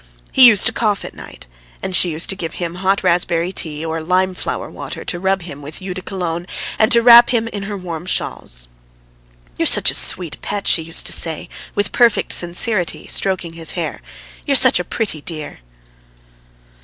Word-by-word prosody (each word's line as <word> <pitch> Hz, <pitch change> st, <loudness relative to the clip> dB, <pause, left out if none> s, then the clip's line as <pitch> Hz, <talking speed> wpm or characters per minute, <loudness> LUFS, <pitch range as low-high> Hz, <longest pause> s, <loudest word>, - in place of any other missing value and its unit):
He 260 Hz, -2 st, +7 dB
used 215 Hz, -5 st, +6 dB
to 225 Hz, -, +3 dB
cough 210 Hz, -4 st, -1 dB
at -, -, -9 dB
night, -, -, -13 dB, 0.4 s
and 190 Hz, -, -2 dB
she 180 Hz, -, +3 dB
used 160 Hz, +1 st, -1 dB
to -, -, -5 dB
give 165 Hz, -4 st, -6 dB
him 170 Hz, -2 st, -5 dB
hot 190 Hz, +2 st, -1 dB
raspberry 170 Hz, 0 st, +1 dB
tea 155 Hz, -4 st, -5 dB
or 160 Hz, 0 st, -4 dB
lime 185 Hz, +3 st, 0 dB
flower -, -, -5 dB
water, -, -, -9 dB
to 175 Hz, -, 0 dB
rub 190 Hz, 0 st, -1 dB
him 145 Hz, -4 st, -10 dB
with 145 Hz, +2 st, -9 dB
eau 185 Hz, -1 st, -6 dB
de 185 Hz, -, -7 dB
Cologne 175 Hz, -3 st, -5 dB, 0.3 s
and 220 Hz, +3 st, +3 dB
to 235 Hz, -1 st, +5 dB
wrap 240 Hz, 0 st, +8 dB
him 230 Hz, -2 st, 0 dB
in 205 Hz, -3 st, -6 dB
her 205 Hz, -, -5 dB
warm 175 Hz, -2 st, -7 dB
shawls. -, -, -3 dB, 0.9 s
"You're -, -, +3 dB
such -, -, +5 dB
a -, -, -7 dB
sweet 175 Hz, -5 st, +2 dB
pet!" 205 Hz, -1 st, -5 dB
she 165 Hz, -, +5 dB
used 165 Hz, +1 st, +3 dB
to -, -, +2 dB
say 160 Hz, -2 st, +1 dB, 0.3 s
with 205 Hz, -1 st, -1 dB
perfect 235 Hz, -3 st, +2 dB
sincerity, 175 Hz, +2 st, 0 dB
stroking 185 Hz, -4 st, -1 dB
his 165 Hz, -1 st, -4 dB
hair. 170 Hz, -3 st, -5 dB, 0.5 s
"You're 280 Hz, -, +2 dB
such 255 Hz, -6 st, +5 dB
a -, -, -2 dB
pretty 190 Hz, -7 st, -2 dB
dear!" 155 Hz, -, -6 dB
180 Hz, 190 wpm, -17 LUFS, 165-205 Hz, 0.9 s, wrap